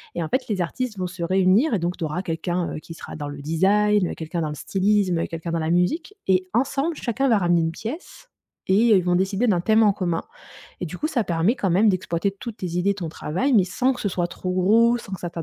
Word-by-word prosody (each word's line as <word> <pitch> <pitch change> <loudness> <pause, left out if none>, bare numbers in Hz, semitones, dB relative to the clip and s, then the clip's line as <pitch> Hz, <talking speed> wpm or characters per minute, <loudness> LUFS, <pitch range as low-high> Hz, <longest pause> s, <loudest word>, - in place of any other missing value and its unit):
et 170 - -1
en 155 - -5
fait, 260 - -1
les 200 -5 -1
artistes 230 +5 -3
vont 185 - -1
se 180 -1 -6
réunir 190 - +3
et 205 - +2
donc, 175 +1 -2
tu 175 - -5
auras 155 +4 -2
quelqu'un, 175 0 -2
heu, - - -5
qui 165 - -10
sera - - -9
dans 150 -1 -5
le 145 0 -7
design, 195 +5 +2
quelqu'un 165 +1 -4
dans 155 - -1
le 150 - -5
stylisme, 190 0 +1
quelqu'un 165 0 -5
dans 165 - 0
la 160 0 -1
musique 180 - 0
et 185 -1 +2
ensemble, 275 +7 0
chacun 270 0 -1
va 225 -5 +4
ramener 175 -2 +2
une 160 - 0
pièce, 240 - -8 0.4
et - - +5 0.2
ils 185 - +3
vont 180 0 +2
décider 195 +6 +1
d'un 180 -6 +2
thème 220 +3 +3
en 205 -2 +4
commun, 175 -4 -1 0.6
et 180 - -2
du 170 - -7
coup - - -1
ça 275 -7 0
permet 170 +6 +1
quand 200 - -1
même 205 +5 +4
d'exploiter 185 0 -1
toutes 215 +3 -8
tes 185 - -4
idées, 200 +3 +2
ton 175 -5 -5
travail, 185 - -1
mais 205 -6 +5
sans 255 +8 0
que 250 - -8
ce 205 - 0
soit 175 -2 -1
trop 180 +1 -4
gros, 220 +6 +4
sans 200 - -11
que 185 - -8
ça 175 - -3
ta 170 -1 -5
185 Hz, 255 wpm, -23 LUFS, 170-215 Hz, 0.6 s, et